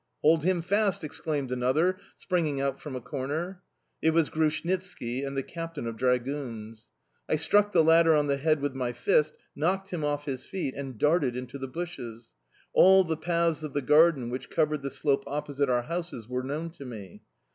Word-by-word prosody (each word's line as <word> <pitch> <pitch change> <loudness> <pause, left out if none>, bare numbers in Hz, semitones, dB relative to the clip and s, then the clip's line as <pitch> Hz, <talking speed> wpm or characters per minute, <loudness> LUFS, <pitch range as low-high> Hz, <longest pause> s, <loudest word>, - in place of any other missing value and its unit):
"Hold 160 0 +5
him 180 -1 +1
fast!" 200 +1 +1
exclaimed 145 -3 -3
another, 145 +9 +1 0.2
springing 160 -7 -1
out 135 0 -1
from 145 -4 -6
a 130 - -4
corner. 145 +9 -4 0.4
It 160 0 +2
was 165 -3 +3
Grushnitski 160 -5 -1
and 135 0 -4
the 135 - 0
captain 165 -4 -6
of 115 -1 -4
dragoons. 125 -3 -2 0.4
I - - +3
struck 205 +7 +3
the 160 - +5
latter 165 0 +6
on 150 -1 +3
the 140 -1 +1
head 155 +1 +1
with 145 -1 -1
my 125 -2 -2
fist, 150 +5 +2 0.2
knocked 190 +5 0
him 170 -4 -3
off 145 0 -1
his 130 -2 -4
feet, 185 -9 -4
and 135 -4 -6
darted 150 -2 +2
into 125 +2 -6
the 135 - -4
bushes. 125 -8 -7 0.4
All 190 +1 +7
the 165 -2 -1
paths 170 -1 0
of 155 -2 -6
the 145 - -1
garden 150 -4 +4
which 130 +1 -5
covered 150 -2 +1
the 140 - -3
slope 140 0 0
opposite 145 -1 -1
our 120 -1 +2
houses 165 -7 -4
were 125 +1 -2
known 150 +6 -4
to 160 -4 -11
me. 105 -7 -9
145 Hz, 190 wpm, -28 LUFS, 130-165 Hz, 0.4 s, All